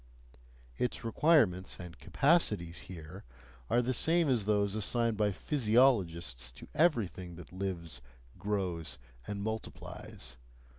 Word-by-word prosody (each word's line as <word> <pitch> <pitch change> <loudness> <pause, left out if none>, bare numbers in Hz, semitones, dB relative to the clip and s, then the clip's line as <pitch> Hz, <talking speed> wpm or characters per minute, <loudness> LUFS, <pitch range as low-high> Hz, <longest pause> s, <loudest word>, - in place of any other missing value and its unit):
Its 125 - -1
requirements 115 - +3
and 90 -1 -9
capacities 95 - +2
here, 90 +1 -9 0.5
are 120 - +3
the 130 +2 0
same 165 +5 +3
as 120 -6 +2
those 100 -1 +2
assigned 115 +2 +2
by 105 -1 +2
physiologists 100 - +2
to - - -12
everything 105 - +1
that 90 +1 -12
lives, 85 -8 -4 0.4
grows, 95 -6 -2 0.3
and 100 -1 -3
multiplies. 105 - -6
100 Hz, 110 wpm, -32 LUFS, 85-120 Hz, 0.5 s, requirements